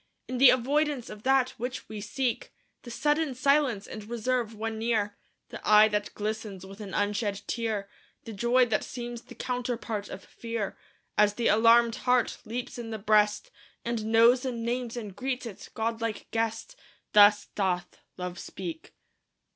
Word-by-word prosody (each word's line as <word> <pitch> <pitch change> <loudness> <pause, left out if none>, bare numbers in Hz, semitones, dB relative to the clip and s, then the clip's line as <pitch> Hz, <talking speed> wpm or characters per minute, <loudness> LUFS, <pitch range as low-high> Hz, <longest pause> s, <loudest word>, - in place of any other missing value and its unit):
In 255 -1 -3
the 270 - +9
avoidance 280 +1 +1
of 210 -1 -9
that 260 0 +3
which 250 +2 -4
we 215 -1 -7
seek 245 +2 -2 0.3
The 240 - -10
sudden 295 +2 0
silence 275 -6 +2
and 215 - -8
reserve 235 -1 -1
when 220 +1 -4
near 220 -3 0 0.3
The - - -8
eye 215 0 +7
that 210 -1 -2
glistens 210 -3 -4
with 195 +2 -11
an 195 -2 -6
unshed 205 0 -1
tear 220 -4 -2 0.4
The 225 - -8
joy 240 +4 +3
that 220 -3 0
seems 240 -1 -6
the - - -14
counterpart 240 -4 -3
of 190 - -8
fear, 230 -3 -4 0.4
As 210 -1 +4
the 235 - +1
alarmed 230 +1 +5
heart 250 -1 +1
leaps 245 +3 -5
in 230 -1 -6
the 220 - -4
breast, 210 - +2 0.3
And 235 -2 -2
knows 230 +3 +5
and 240 -3 -3
names 240 0 -2
and 210 -5 -6
greets 255 +3 -3
its 220 -5 -9
godlike 225 0 -3
guest 225 - -2 0.4
Thus 205 0 +6
doth 180 -3 -1 0.2
Love 180 -1 -5
speak. 330 -1 -7
230 Hz, 160 wpm, -28 LUFS, 210-250 Hz, 0.4 s, the